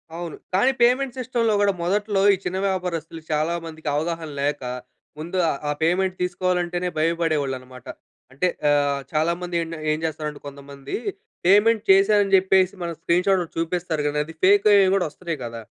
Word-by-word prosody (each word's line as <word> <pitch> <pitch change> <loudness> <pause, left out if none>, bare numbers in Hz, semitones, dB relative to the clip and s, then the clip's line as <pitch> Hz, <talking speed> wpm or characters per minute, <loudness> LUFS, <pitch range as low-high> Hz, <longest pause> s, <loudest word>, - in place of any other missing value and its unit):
అవును. 170 -1 -6 0.2
కానీ, 225 +8 +4
పేమెంట్ 255 +2 +2
సిస్టమ్‌లో 235 -3 0
గూడా 200 -1 +3
మొదట్లో, 205 +2 0
ఈ - - +2
చిన్న 180 +1 -2
వ్యాపారస్తులు 170 -4 -3
చాలా 155 +2 +1
మందికి 160 -1 -9
అవగాహన 165 +1 -2
లేక, 145 -1 -1 0.6
ముందు 170 +4 -4
ఆహ్, 140 - -2
ఆ - - +1
పేమెంట్ 185 +3 +1
తీసుకోవాలంటేనే 180 0 -1
భయపడేవాళ్ళన్నమాట. 145 -6 -1 0.5
అంటే 145 +7 0 0.2
ఆహ్, 145 -1 +2
చాలామంది 170 +3 -1
ఏండ 165 0 -5 0.2
ఏం 155 - -3
చేస్తారంటే 150 -2 -4
కొంతమంది, 140 0 -8 0.5
పేమెంట్ 210 +4 +4
చేశా 195 +2 +5
అని 195 - -4
చెప్పేసి, 190 0 +3
మన 170 - -3
స్క్రీన్‌షాటోటి 180 0 +1
చూపిస్తారు 165 -2 -2
గానీ, 150 0 -1
అది 160 +1 -11
ఫేకయ్యేయి 200 0 +5
గూడా 195 - +1
వస్తున్నాయి 165 0 -6
గదా! 115 -1 -7
175 Hz, 150 wpm, -23 LUFS, 155-190 Hz, 0.6 s, చేశా